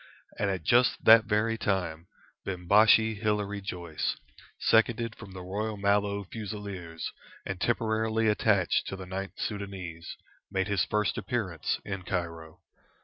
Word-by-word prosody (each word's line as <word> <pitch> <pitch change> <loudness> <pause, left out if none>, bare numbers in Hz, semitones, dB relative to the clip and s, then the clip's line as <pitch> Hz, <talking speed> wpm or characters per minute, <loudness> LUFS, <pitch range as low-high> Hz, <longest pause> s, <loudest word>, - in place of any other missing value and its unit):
And 95 -5 -1
just 120 +4 +5
at - - -23
that 115 0 +9
very 110 +1 +1
time, 90 -4 -1 0.4
Bimbashi 105 +4 +4
Hilary 105 -1 -1
Joyce, 85 -5 -3 0.4
seconded 115 0 +2
from 95 - -11
the 90 -1 -7
Royal 105 +3 -3
Mallow 100 0 +1
Fusiliers, 100 -5 -6 0.3
and 95 -2 -5
temporarily 110 -1 +1
attached 105 -3 +2
to - - -4
the 95 -1 -8
Ninth 95 +1 -5
Soudanese, 95 -5 -5 0.3
made 95 0 -1
his 100 -4 +1
first 105 -2 0
appearance 105 - -2
in 95 -2 -4
Cairo. 85 -3 -5
100 Hz, 130 wpm, -29 LUFS, 90-110 Hz, 0.4 s, that